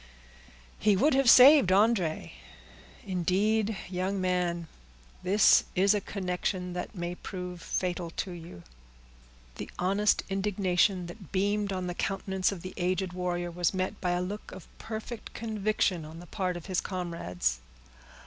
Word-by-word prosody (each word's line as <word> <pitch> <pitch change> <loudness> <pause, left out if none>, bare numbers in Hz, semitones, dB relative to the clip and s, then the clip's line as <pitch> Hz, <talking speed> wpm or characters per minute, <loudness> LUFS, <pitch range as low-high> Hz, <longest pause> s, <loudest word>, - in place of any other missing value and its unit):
He 210 -1 +4
would 285 +8 +3
have 270 -2 +4
saved 265 -3 +9
André. 190 -4 +2 0.7
Indeed, 200 +4 +1
young 185 +2 -2
man, 180 -2 0 0.5
this 195 +3 +5
is 195 +2 +4
a 205 - 0
connection 180 -1 -3
that 180 +4 -5
may 175 -1 -3
prove 180 -1 -7
fatal 175 -1 -2
to 190 - -2
you!" 165 - -10 0.9
The - - -6
honest 200 +3 +2
indignation 195 -2 +1
that 175 +1 -11
beamed 205 +1 0
on 185 -1 -2
the 175 - -3
countenance 190 0 -1
of 185 -4 -7
the 185 - -7
aged 185 +1 -1
warrior 175 -1 -2
was 175 +1 0
met 185 +3 -2
by 180 -1 +1
a 175 0 0
look 205 +3 -6
of 185 - -10
perfect 220 +1 -7
conviction 215 -5 0
on 155 +1 -10
the 175 - -10
part 180 -1 -2
of 170 - -10
his 185 -2 -1
comrades. 130 - -2
185 Hz, 145 wpm, -29 LUFS, 175-200 Hz, 0.9 s, saved